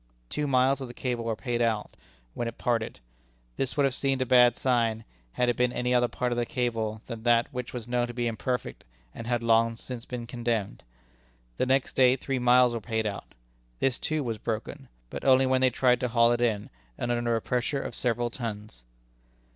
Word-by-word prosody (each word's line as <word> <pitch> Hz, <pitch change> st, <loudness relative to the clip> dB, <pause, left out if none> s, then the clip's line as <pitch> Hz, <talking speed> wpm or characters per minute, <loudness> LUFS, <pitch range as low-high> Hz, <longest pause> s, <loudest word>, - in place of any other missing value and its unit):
Two 150 Hz, -, -1 dB
miles 135 Hz, +1 st, +3 dB
of 130 Hz, -, -4 dB
the 120 Hz, -, -11 dB
cable 120 Hz, -3 st, -3 dB
were 115 Hz, -1 st, -1 dB
paid 120 Hz, +1 st, -2 dB
out, 110 Hz, -3 st, 0 dB, 0.4 s
when 120 Hz, -, -3 dB
it 115 Hz, -, -6 dB
parted. 115 Hz, -, -1 dB, 0.6 s
This 135 Hz, +2 st, -2 dB
would 145 Hz, -, +4 dB
have 135 Hz, -2 st, +2 dB
seemed 135 Hz, 0 st, 0 dB
a -, -, -6 dB
bad 125 Hz, -1 st, +6 dB
sign, 115 Hz, -3 st, +1 dB, 0.3 s
had 125 Hz, -, +1 dB
it 120 Hz, -, +2 dB
been 125 Hz, 0 st, +2 dB
any 125 Hz, 0 st, -1 dB
other 120 Hz, 0 st, +4 dB
part 125 Hz, +1 st, -2 dB
of 120 Hz, -, 0 dB
the -, -, +2 dB
cable 115 Hz, -4 st, -2 dB
than 115 Hz, -2 st, -7 dB
that 120 Hz, +1 st, +2 dB
which 125 Hz, -1 st, -4 dB
was 120 Hz, -2 st, -6 dB
known 120 Hz, 0 st, 0 dB
to 120 Hz, -, -7 dB
be 120 Hz, -1 st, -1 dB
imperfect 125 Hz, +2 st, -3 dB, 0.3 s
and 115 Hz, -, -8 dB
had 120 Hz, -1 st, 0 dB
long 115 Hz, 0 st, +3 dB
since 120 Hz, +1 st, -7 dB
been 125 Hz, -2 st, -5 dB
condemned. 115 Hz, -4 st, -3 dB, 0.7 s
The -, -, 0 dB
next 135 Hz, 0 st, +1 dB
day 130 Hz, -1 st, +5 dB
three 135 Hz, 0 st, -3 dB
miles 125 Hz, 0 st, +5 dB
were 115 Hz, -, -3 dB
paid 110 Hz, 0 st, -2 dB
out. 100 Hz, -2 st, -5 dB, 0.4 s
This, 130 Hz, -, 0 dB
too, 155 Hz, -2 st, -1 dB
was 115 Hz, -4 st, -3 dB
broken, 110 Hz, -2 st, -4 dB, 0.2 s
but -, -, -6 dB
only 130 Hz, 0 st, +5 dB
when 130 Hz, 0 st, +2 dB
they 130 Hz, -, +5 dB
tried 125 Hz, 0 st, +2 dB
to 125 Hz, -, 0 dB
haul 115 Hz, 0 st, +4 dB
it 120 Hz, 0 st, 0 dB
in, 110 Hz, -4 st, 0 dB, 0.3 s
and 120 Hz, -, -2 dB
under 120 Hz, -1 st, +1 dB
a -, -, +1 dB
pressure 125 Hz, +3 st, -1 dB
of -, -, -5 dB
several 120 Hz, -1 st, -1 dB
tons. 105 Hz, -, -6 dB
120 Hz, 210 wpm, -27 LUFS, 115-125 Hz, 0.7 s, bad